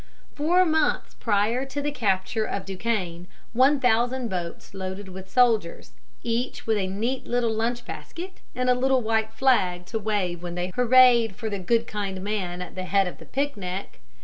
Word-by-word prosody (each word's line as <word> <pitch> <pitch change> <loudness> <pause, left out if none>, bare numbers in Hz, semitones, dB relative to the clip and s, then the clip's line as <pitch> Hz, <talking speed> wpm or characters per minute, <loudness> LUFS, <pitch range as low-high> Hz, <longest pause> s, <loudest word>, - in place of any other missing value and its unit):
Four 350 +5 +3
months 315 -2 +1
prior 220 +4 +1
to 280 +2 -4
the 290 +1 -1
capture 210 -3 0
of 200 -2 -4
Duquesne, 185 -4 -3 0.3
one 265 +4 +4
thousand 245 0 +2
boats 175 0 -5
loaded 190 +1 -5
with 190 +1 -9
soldiers, 225 -7 +2 0.3
each 235 +2 -2
with 220 -1 +2
a 190 - -1
neat 230 +7 -2
little 240 -2 +1
lunch 235 +2 -1
basket 370 +2 -8 0.2
and 250 0 -1
a 250 - +6
little 260 0 +2 0.3
flag 195 -8 +2
to 225 +4 -3
wave 195 -5 -1
when 175 -1 -5
they 180 +1 -2
hurrahed 245 -3 +5
for 220 -1 -4
the 200 - -2
good 230 +5 +1
kind 200 -4 -4
man 185 -4 -2
at 180 - -10
the 185 0 -5
head 195 +1 +3
of 180 - -7
the - - -12
picnic, 200 -9 -3
viz. - - -26
220 Hz, 175 wpm, -25 LUFS, 190-250 Hz, 0.3 s, a